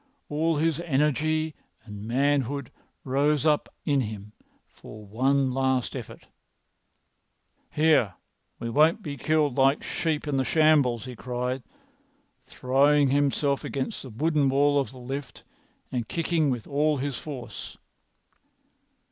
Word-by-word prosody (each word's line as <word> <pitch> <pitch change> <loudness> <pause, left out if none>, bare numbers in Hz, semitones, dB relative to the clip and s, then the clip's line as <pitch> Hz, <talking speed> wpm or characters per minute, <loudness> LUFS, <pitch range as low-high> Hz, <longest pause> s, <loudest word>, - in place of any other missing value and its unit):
All 160 +2 +1
his 160 0 +1
energy 155 0 0 0.3
and 105 -1 -8
manhood 140 +1 0 0.3
rose 145 +2 +1
up 150 -2 +2 0.2
in 140 -2 +2
him 105 -2 -6 0.3
for 110 0 -13
one 130 +5 +1
last 130 -1 0
effort. - - -8 1.4
"Here, 150 - +3 0.4
we 115 - -5
won't 160 - +3
be 145 -3 -5
killed 150 -1 +1
like 135 +2 +3
sheep 155 -2 -2
in 140 -2 0
the 135 - +2
shambles!" 145 -7 +3
he 125 -1 -7
cried, 125 +2 -3 0.9
throwing 140 +3 +3
himself 140 0 +1
against 135 -1 -4
the 130 - -9
wooden 145 +4 +1
wall 145 +1 +3
of 135 - -2
the 130 - -13
lift 130 +1 -7 0.5
and 120 -3 -2
kicking 165 -2 +1
with 120 -4 -2
all 150 +1 +1
his 135 -1 -3
force. 135 -6 -8
140 Hz, 125 wpm, -26 LUFS, 125-150 Hz, 1.4 s, Here